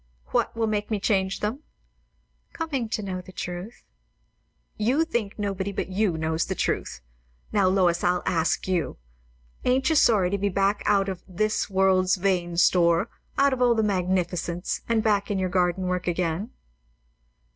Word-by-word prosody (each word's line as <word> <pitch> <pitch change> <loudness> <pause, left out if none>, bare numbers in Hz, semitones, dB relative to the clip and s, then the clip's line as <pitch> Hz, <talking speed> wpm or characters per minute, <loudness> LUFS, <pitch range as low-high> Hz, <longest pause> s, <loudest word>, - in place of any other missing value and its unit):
"What - - 0
will 225 - +1
make 210 -1 -1
me 215 -2 -1
change 190 -1 0
them?" 215 +6 -2 0.9
"Coming 275 -8 -3
to 215 -1 -2
know 185 -2 -4
the 185 - -13
truth." 180 +5 -7 0.9
"You 255 +10 +1
think 235 -10 -3
nobody 200 -1 -2
but 195 - -3
you 190 -3 0
knows 160 +1 0
the - - -2
truth. 65 - -2 0.5
Now, 200 -3 +3
Lois, 185 -2 +2
I'll 180 0 +1
ask 165 +1 0
you. 180 -6 -1 0.7
Ain't 265 +4 +2
you - - +2
sorry 205 -10 +4
to 200 - -1
be 200 +1 +1
back 195 +2 +1
and - - +3
out 195 -1 +1
of 185 -2 -4
'this 215 +4 -1
world's 190 -1 +3
vain 180 -3 0
store' 170 -1 +4 0.3
out 280 0 +4
of 255 - -3
all 240 -1 +4
the 220 - +2
magnificence, 180 -3 -1
and 225 -2 +2
back 205 -2 +1
in 205 - 0
your 185 -1 0
garden 180 0 +1
work 180 0 -2
again?" 175 +4 -1
190 Hz, 165 wpm, -25 LUFS, 180-215 Hz, 0.9 s, sorry